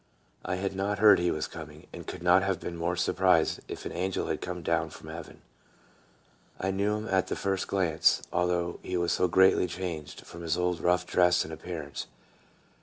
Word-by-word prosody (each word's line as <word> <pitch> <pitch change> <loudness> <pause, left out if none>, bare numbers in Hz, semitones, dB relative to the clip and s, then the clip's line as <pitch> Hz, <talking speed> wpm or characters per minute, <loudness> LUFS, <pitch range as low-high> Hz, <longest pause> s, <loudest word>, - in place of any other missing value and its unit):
I 90 - -2
had 95 +1 -3
not 100 +2 -1
heard 105 -2 +7
he 85 0 +1
was 75 -2 -1
coming, - - -10
and - - -9
could - - -7
not 90 +1 +5
have 95 -2 -1
been 85 - -5
more 85 +1 -1
surprised 90 -1 +2
if - - -7
an - - -4
angel 95 +1 -2
had - - -2
come 90 -1 -5
down - - 0
from - - -11
heaven. - - -9 1.2
I 95 - 0
knew 100 +2 0
him 105 +1 -4
at 95 -1 +1
the - - -2
first 95 -1 -1
glance, 85 -5 +2
although 90 -1 0
he 90 - -3
was 85 -1 0
so 90 - +2
greatly 95 +1 +4
changed 85 -5 -5
from 85 - -11
his 85 0 -1
old 90 -1 0
rough 90 0 +2
dress 90 -1 +3
and 80 - -8
appearance. 80 -3 -6
90 Hz, 195 wpm, -29 LUFS, 85-95 Hz, 1.2 s, heard